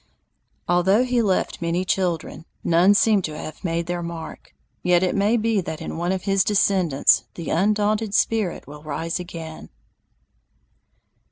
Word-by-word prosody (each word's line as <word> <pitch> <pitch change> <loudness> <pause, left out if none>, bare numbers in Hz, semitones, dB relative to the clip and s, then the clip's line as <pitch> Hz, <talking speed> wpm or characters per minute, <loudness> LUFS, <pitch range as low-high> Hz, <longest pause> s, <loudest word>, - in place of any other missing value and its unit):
Although 190 +6 +3
he 250 -1 +1
left 195 -5 0
many 170 +2 -1
children, 170 -4 -2 0.2
none 175 +4 +4
seem 210 -1 +4
to 155 -3 -5
have 155 - -8
made 170 -1 -1
their 175 0 -3
mark, 170 -1 -8 0.3
yet 180 0 +3
it 185 - +1
may 210 +4 +2
be 225 -2 +1
that 160 -3 -6
in - - -6
one 175 +2 -1
of 190 -1 -2
his 195 -2 +2
descendants 190 -8 +3
that 170 - -7
undaunted 210 +3 +1
spirit 220 -6 0
will 150 +1 -11
rise 160 +3 -3
again. 165 -3 -8
180 Hz, 150 wpm, -23 LUFS, 165-205 Hz, 0.3 s, none